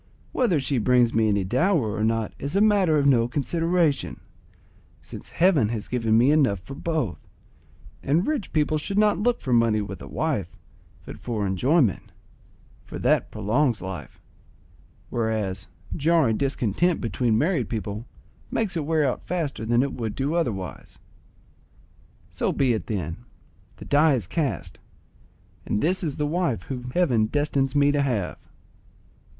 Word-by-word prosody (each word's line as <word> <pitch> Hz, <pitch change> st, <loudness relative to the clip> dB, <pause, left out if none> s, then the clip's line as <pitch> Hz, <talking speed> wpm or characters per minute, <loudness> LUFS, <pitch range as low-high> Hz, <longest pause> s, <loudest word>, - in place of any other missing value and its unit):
Whether 225 Hz, -, +2 dB
she 135 Hz, -1 st, -1 dB
brings 120 Hz, 0 st, +3 dB
me 110 Hz, -1 st, +3 dB
any 100 Hz, -2 st, +1 dB
dower 125 Hz, -, +1 dB
or 105 Hz, -, -1 dB
not 115 Hz, -1 st, 0 dB
is 140 Hz, +6 st, -3 dB
a -, -, +4 dB
matter 200 Hz, -7 st, +4 dB
of 140 Hz, -, +2 dB
no 120 Hz, -4 st, +4 dB
consideration, 165 Hz, +3 st, 0 dB, 0.8 s
since -, -, -10 dB
Heaven 165 Hz, -, +3 dB
has 110 Hz, -2 st, -4 dB
given 115 Hz, -3 st, +1 dB
me 125 Hz, +5 st, +5 dB
enough 135 Hz, -, +3 dB
for 115 Hz, +10 st, -10 dB
both, 150 Hz, -, -2 dB, 0.8 s
and 160 Hz, +7 st, +1 dB
rich 295 Hz, -10 st, -2 dB
people 155 Hz, 0 st, +1 dB
should 195 Hz, +6 st, -4 dB
not 210 Hz, -3 st, +3 dB
look 240 Hz, +3 st, +1 dB
for 130 Hz, -, -2 dB
money 115 Hz, -2 st, +3 dB
with 100 Hz, -, -6 dB
a -, -, -8 dB
wife, -, -, -2 dB, 0.5 s
but -, -, -9 dB
for 110 Hz, -4 st, -3 dB
enjoyment, 120 Hz, -, +1 dB, 0.7 s
for -, -, -8 dB
that -, -, +1 dB
prolongs 120 Hz, +3 st, 0 dB
life, 90 Hz, -7 st, -8 dB, 0.9 s
whereas 110 Hz, -5 st, -2 dB, 0.3 s
jarring 155 Hz, -6 st, +3 dB
discontent 140 Hz, -, 0 dB
between 115 Hz, 0 st, 0 dB
married 150 Hz, -, 0 dB
people 105 Hz, +1 st, -4 dB, 0.4 s
makes 205 Hz, -5 st, -1 dB
it 160 Hz, -3 st, -2 dB
wear 155 Hz, -2 st, +2 dB
out 125 Hz, -, -2 dB
faster 155 Hz, -10 st, -3 dB
than 120 Hz, +2 st, +3 dB
it 140 Hz, -, -3 dB
would 115 Hz, -4 st, -4 dB
do 140 Hz, +3 st, -1 dB
otherwise. 100 Hz, -, -3 dB, 1.3 s
So -, -, -1 dB
be 130 Hz, -3 st, +2 dB
it 105 Hz, -6 st, -4 dB
then; 85 Hz, -6 st, -3 dB, 0.6 s
the -, -, -11 dB
die 150 Hz, 0 st, +4 dB
is 115 Hz, -, -3 dB
cast, 145 Hz, -, -3 dB, 0.8 s
and 105 Hz, -, -1 dB
this 180 Hz, -, 0 dB
is 150 Hz, -5 st, -3 dB
the 150 Hz, -, 0 dB
wife 150 Hz, -, -1 dB
whom 125 Hz, -2 st, -6 dB
heaven 125 Hz, -8 st, +2 dB
destines 140 Hz, 0 st, 0 dB
me 145 Hz, 0 st, +4 dB
to 145 Hz, 0 st, +1 dB
have." 120 Hz, -10 st, -2 dB
130 Hz, 155 wpm, -25 LUFS, 110-160 Hz, 1.3 s, me